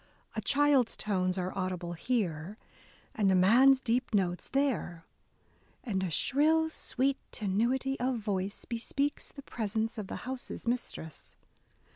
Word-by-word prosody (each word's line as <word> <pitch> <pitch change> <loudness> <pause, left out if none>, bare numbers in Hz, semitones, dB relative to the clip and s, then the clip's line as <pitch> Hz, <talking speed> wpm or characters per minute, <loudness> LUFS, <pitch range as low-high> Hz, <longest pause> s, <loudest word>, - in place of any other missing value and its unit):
A - - -1
child's 285 -4 +3
tones 185 -3 0
are 185 +1 -2
audible 185 -2 -3
here, 185 -3 -2 0.6
and 200 -3 +2
a - - +4
man's 250 +9 +6
deep 245 -2 0
notes 180 -3 0
there; 245 -12 -1 0.8
and 195 -7 -1
a 190 - -1
shrill, 310 - +2
sweet 270 -2 0
tenuity 240 +7 0
of 250 0 0
voice" 200 -2 -3
bespeaks 275 +5 -2
the 280 - -11
presence 220 0 -2
of 205 - -5
the - - -5
house's 255 -1 -6
mistress. 230 - -4
225 Hz, 130 wpm, -31 LUFS, 185-265 Hz, 0.8 s, man's